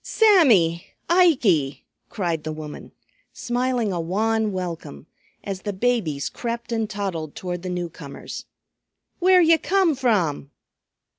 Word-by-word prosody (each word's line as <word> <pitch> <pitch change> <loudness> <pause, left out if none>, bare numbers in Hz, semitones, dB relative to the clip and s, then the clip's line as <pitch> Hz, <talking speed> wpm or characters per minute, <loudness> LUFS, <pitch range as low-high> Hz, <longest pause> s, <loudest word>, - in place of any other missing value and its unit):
"Sammy! 235 - +4 0.2
Ikey!" 240 - +3 0.2
cried 170 -5 -2
the 155 - -4
woman, 155 -1 -8 0.4
smiling 245 -3 -1
a 170 - -2
wan 215 +5 0
welcome, 170 - -6 0.4
as 195 -2 -5
the 205 - -4
babies 190 - 0
crept 235 0 -5
and 225 -2 -1
toddled 185 -7 -4
toward 180 -1 -5
the 185 - -5
newcomers. 170 -5 -6 0.7
"Where 365 0 +5
ye 330 -1 +5
come 370 0 +2
from?" 200 - 0
200 Hz, 120 wpm, -23 LUFS, 165-245 Hz, 0.7 s, Where